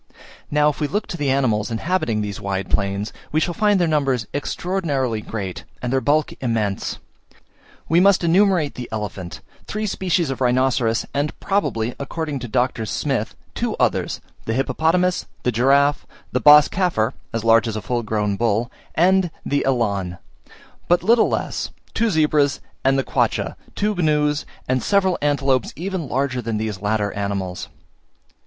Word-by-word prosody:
Now, 150 0 +3
if 150 - -5
we 150 - +1
look 205 +7 -1
to - - -4
the 145 -4 -1
animals 120 -6 +1
inhabiting 115 -3 0
these 105 -2 -4
wide 95 -1 -3
plains, 100 +1 -1 0.2
we 155 - +2
shall 175 +2 0
find 205 +2 +3
their 175 - +2
numbers 135 -6 +1
extraordinarily 145 - -1
great, 100 -5 -5 0.2
and 125 +1 -3
their 135 - +2
bulk 150 +2 +1
immense. 110 -6 -1 0.9
We 165 - +4
must 195 0 +5
enumerate 175 -3 +3
the 125 - -7
elephant, 100 -5 -5 0.3
three 215 +1 -3
species 180 -6 0
of 135 - -5
rhinoceros, 125 -2 +2
and 145 +1 -2
probably, 120 - 0
according 145 +1 -3
to 120 - -6
Dr. 120 -1 0
Smith, 90 - -2 0.2
two - - -2
others, - - 0 0.2
the 110 - -1
hippopotamus, 165 +8 +1 0.2
the 125 - +2
giraffe, 140 +5 +3 0.2
the 125 - +1
bos 150 0 +8
caffer 150 - 0 0.2
as 115 -1 -2
large 115 0 +5
as 110 - -3
a 110 - -3
full 120 +5 -1
grown 105 -2 -1
bull, 115 +1 0 0.2
and 185 +2 +4 0.2
the 140 0 +1
elan 100 -8 0 0.7
but 175 0 +3
little 230 +4 +4
less, - - -2 0.2
two 230 0 +1
zebras, 150 -5 +2 0.2
and 135 +1 +3
the 135 - +1
quaccha, - - 0 0.2
two 210 +1 +1
gnus, 150 -4 +1 0.2
and 130 0 +1
several 190 -3 +2
antelopes 140 -3 +1
even 175 -3 -4
larger 130 0 0
than 115 -1 -2
these 105 -3 -3
latter 105 0 0
animals. 100 -3 -3
135 Hz, 160 wpm, -21 LUFS, 110-160 Hz, 0.9 s, bos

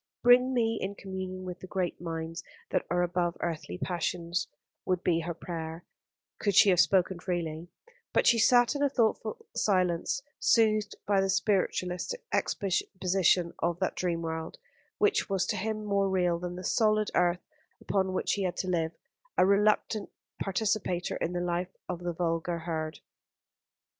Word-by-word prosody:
"Bring 250 +1 +6
me 230 -3 +1
in 195 +1 -3
communion 185 -1 -6
with 180 -1 -6
the 185 - -9
great 180 -3 -2
minds 165 0 -4 0.3
that - - +1
are 175 0 +2
above 175 0 0
earthly 155 - -3
passions," 175 - -2 0.4
would 185 -1 -1
be 170 -2 +2
her 170 0 -4
prayer, 165 -1 -6 0.5
could 205 -2 0
she 200 0 +7
have 180 - +3
spoken 185 -2 +3
freely; 170 -2 -3 0.4
but - - +2
she 235 - +5
sat 245 +3 +5
in 285 - -3
a 285 - +3
thoughtful 225 -4 0
silence, 185 +5 +1 0.2
soothed 215 -2 +3
by 200 -1 +3
the 195 - 0
spiritualist's 190 - 0 0.2
exposition 185 -2 +1
of 170 0 0
that 190 0 -1
dream 170 -2 -1
world, 160 0 -4 0.4
which 420 - +2
was 195 -2 +1
to - - -1
him 215 +1 -3
more 200 -1 +1
real 180 -2 +1
than 180 0 -5
the 185 - -7
solid 215 +1 +2
earth 175 0 +2 0.3
upon 190 -1 0
which 185 - 0
he 200 - -1
had 180 -2 -1
to 185 - -2
live 165 -2 0 0.4
a - - +6
reluctant 210 +1 +2 0.3
participator 195 -3 -1
in 175 - -2
the 175 - -1
life 175 +1 -2
of 180 -2 -4
the 175 0 -3
vulgar 170 0 -1
herd. 160 -2 -4
185 Hz, 160 wpm, -29 LUFS, 175-200 Hz, 0.5 s, she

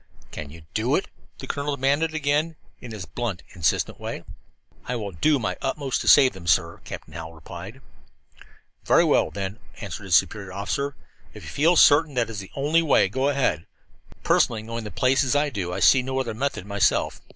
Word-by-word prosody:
"Can 75 - -7
you 80 +2 -13
do - - +1
it?" - - -1 0.3
the - - -8
colonel 145 0 -2
demanded 145 +4 +1
again, 155 +2 0 0.2
in 120 - -10
his 105 -5 -6
blunt, 115 -5 -4
insistent 85 -5 -1
way. - - -6 0.6
"I 125 - -2
will 105 -4 -4
do 145 - +2
my 110 -5 -3
utmost 135 -1 -2
to - - -6
save 135 -4 +7
them, 90 -3 -11
sir," 85 0 +1
Captain - - -9
Hallowell 80 +1 -8
replied. 90 - -10 1.0
"Very - - +4
well, - - +3
then," 100 +2 -5 0.2
answered 100 -1 -7
his 90 -3 +3
superior 100 -1 +1
officer. 140 +9 -2 0.4
"If - - -10
you - - -8
feel 165 +5 +3
certain 150 -2 +5
that 115 -2 0
is 105 - -5
the 95 - -9
only 150 +4 +2
way, 150 - +3
go 130 +6 0
ahead. 130 - 0 0.6
Personally, 110 -2 +2
knowing 115 0 -5
the - - -5
place 130 +5 +2
as 135 +1 0
I 145 0 +2
do, 95 -7 -3
I 90 - -3
see 95 +9 +6
no 130 +1 -2
other 125 -4 -2
method 115 -5 -3
myself. 100 -1 +1
120 Hz, 195 wpm, -24 LUFS, 95-140 Hz, 1.0 s, save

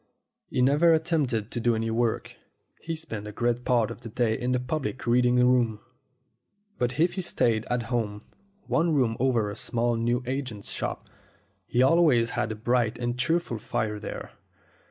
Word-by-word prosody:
He 125 - +1
never 150 +6 +5
at 160 0 +1
tempt; 160 -6 +1
ed 110 -2 -2
to - - -3
do 120 0 +2
any 115 0 -1
work. 115 0 -1 0.5
He 165 0 -3
spent 115 -10 -6
a - - -6
great 120 +3 -1
part 120 -4 +2
of - - -9
the 115 - -8
day 115 0 +1
in 125 +2 -2
the 125 - +2
public 130 +1 -3
reading 125 +1 +3
room. 125 -3 +3 1.0
But 125 +2 -1
if 170 +2 +3
he 190 - -3
stayed 115 -10 +1
at 125 -1 0
home 110 -3 -2 0.4
one 165 -1 +1
room 120 -5 +2
over 120 -5 +1
a - - -7
small 120 +2 0
news 120 +2 0
agent's 125 -5 -4
shop - - -4 0.6
he 125 - +2
always 130 -6 +4
had 115 - -1
a - - -3
bright 120 +1 0
and 120 0 -2
cheerful 160 -5 0
fire 105 0 -2
there. - - -7
120 Hz, 180 wpm, -27 LUFS, 115-130 Hz, 1.0 s, never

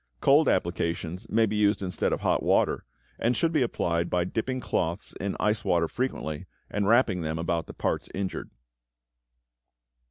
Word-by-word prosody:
Cold 145 +2 +5
applications 85 0 -1
may 115 +1 +4
be 105 0 -2
used 105 -1 +2
instead 90 -1 -1
of - - -1
hot - - +2
water, - - +2 0.3
and 120 +1 +1
should 165 - +2
be 155 -4 +2
applied 85 -8 0
by 90 -1 +1
dipping 120 +8 -2
cloths 85 -8 -2
in 100 +1 -2
ice 105 0 +1
water 85 -1 +2
frequently, 80 - -3 0.2
and 100 -1 0
wrapping 110 -5 +4
them 80 0 -2
about 85 0 -1
the - - -8
parts - - -2
injured. 95 -1 -4
100 Hz, 160 wpm, -27 LUFS, 85-115 Hz, 0.3 s, Cold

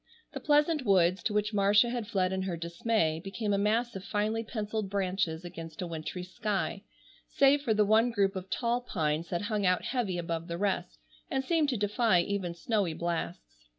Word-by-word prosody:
The - - -4
pleasant 300 0 +2
woods, 185 -4 +3
to - - -1
which 210 +1 0
Marcia 205 +3 +4
had 240 -4 -3
fled 190 -4 0
in 190 - -1
her 185 -3 -3
dismay, 170 -1 0
became 205 +1 -2
a 200 - +2
mass 225 +3 +1
of 190 - -6
finely 215 +3 -1
penciled 215 -2 -3
branches 185 -4 -1
against 165 -2 -8
a 180 - -2
wintry 170 +2 -5
sky, 200 +1 -2 0.5
save 280 +1 +4
for 230 -6 +1
the 210 0 +4
one 220 +3 +4
group 200 -4 +1
of 190 0 -6
tall 240 +2 0
pines 160 -7 -2
that 175 +2 -2
hung 210 -1 -1
out 180 -1 +2
heavy 225 -9 -1
above 165 -1 -3
the 170 -1 -4
rest, 190 -2 -1 0.3
and 265 -1 -1
seemed 320 -2 +2
to 250 - 0
defy 210 -1 +2
even 185 -2 -3
snowy 195 -2 0
blasts. 110 - -4
200 Hz, 190 wpm, -30 LUFS, 175-225 Hz, 0.5 s, Marcia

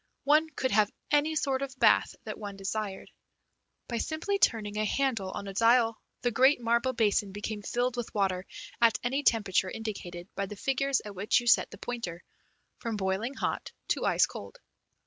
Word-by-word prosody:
One 305 +3 +4
could 260 -3 -2
have 210 0 +3 0.2
any 295 +2 +3
sort 275 -3 0
of 270 -1 -5
bath - - +4
that - - -6
one 205 -2 -6
desired. 195 0 -4 0.8
By 235 -2 -2
simply 340 - -1
turning 215 - +1
a - - +2
handle 225 -4 0
on 200 - -6
a 195 - -5
dial 230 +1 +3 0.2
the 245 - +2
great 260 +5 +5
marble 235 +2 +1
basin 210 -4 +1
became 205 +1 -5
filled 245 +4 -1
with 240 - -4
water 190 -2 0 0.3
at 230 -2 +5
any 265 +4 0
temperature 200 -7 +2
indicated 185 -5 -6
by 200 - -2
the 210 - -7
figures 270 +4 0
at 205 - -7
which 200 +4 +2
you 240 - -7
set 240 - +4
the - - -11
pointer, 180 -9 -5 0.6
from 230 -2 -3
boiling 200 +7 -1
hot - - -3 0.2
to - - 0
ice - - +4
cold. - - -9
230 Hz, 180 wpm, -29 LUFS, 200-260 Hz, 0.8 s, great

